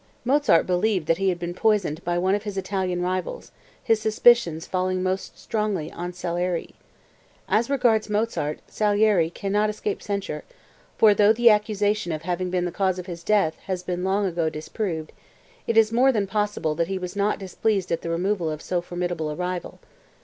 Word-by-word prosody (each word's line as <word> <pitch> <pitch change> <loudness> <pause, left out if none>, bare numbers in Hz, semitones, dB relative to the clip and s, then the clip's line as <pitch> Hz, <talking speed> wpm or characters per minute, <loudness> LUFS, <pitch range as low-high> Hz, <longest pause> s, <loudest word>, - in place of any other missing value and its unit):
(Mozart 265 - +4
believed 185 -1 +1
that 165 +3 +1
he 195 0 +2
had 180 - -1
been 175 0 -4
poisoned 190 -6 +1
by 175 0 -1
one 185 +2 +2
of 205 - +1
his 205 -2 -6
Italian 185 -2 -1
rivals, 185 - -3 0.3
his 225 -3 +2
suspicion 220 -6 +4
falling 185 +2 -1
most 185 +1 -3
strongly 210 -7 -2
on 175 +1 -5
Salieri. 175 0 -3 0.7
["As 230 +4 +1
regards 235 -6 +2
Mozart, 210 -8 -1
Salieri 205 -5 +2
cannot 205 +4 0
escape 210 -1 -3
censure, 200 -7 -4 0.5
for 215 -2 +6
though 205 +1 +5
the 235 0 +6
accusation 210 -3 +1
of 155 0 -4
having 180 +1 -2
been 180 -1 0
the 175 - -2
cause 185 0 0
of 180 - -6
his 170 -2 -8
death 200 -7 +2
has 185 -2 -2
been 180 0 -3
long 195 +2 +1
ago 170 -3 0
disproved, 160 +1 -4 0.6
it 230 - +1
is 220 -1 +5
more 255 +3 +4
than 210 -5 0
possible 205 -6 -1
that 165 +2 -1
he 195 +1 -2
was 180 0 -6
not 200 +1 +1
displeased 195 0 -1
at 165 - 0
the 170 - -5
removal 175 0 0
of 155 0 -5
so 180 -1 -1
formidable 175 -3 -3
a 150 - -4
rival. 180 +1 -4
185 Hz, 185 wpm, -24 LUFS, 175-210 Hz, 0.7 s, for